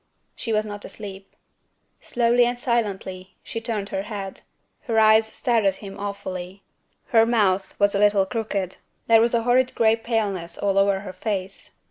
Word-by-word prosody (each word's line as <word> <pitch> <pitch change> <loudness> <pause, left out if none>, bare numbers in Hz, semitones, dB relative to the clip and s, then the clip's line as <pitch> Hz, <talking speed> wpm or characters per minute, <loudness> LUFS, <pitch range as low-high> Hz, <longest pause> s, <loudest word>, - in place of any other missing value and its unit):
She 230 - -4
was 215 0 +1
not 205 -1 -7
asleep. 195 -2 -10 0.7
Slowly 240 0 +2
and 245 +1 -1
silently, 195 -6 -2
she 230 - -5
turned 215 -4 -3
her 190 - -2
head. 200 -2 -6 0.4
Her 230 -4 -1
eyes 220 0 +6
stared 230 0 0
at 195 -1 +2
him 195 0 -10
awfully. 195 -2 -6 0.5
Her 225 -3 +5
mouth 205 -5 +1
was 200 0 +3
a 200 - +1
little 205 -1 +4
crooked. 200 -4 -3 0.3
There 225 -1 +6
was 235 +1 +2
a 230 - +1
horrid 250 +2 +2
gray 225 -1 +4
paleness 215 -7 -2
all 195 -1 +1
over 195 -1 +2
her 190 -2 -8
face. 195 0 -4
205 Hz, 165 wpm, -23 LUFS, 195-230 Hz, 0.7 s, eyes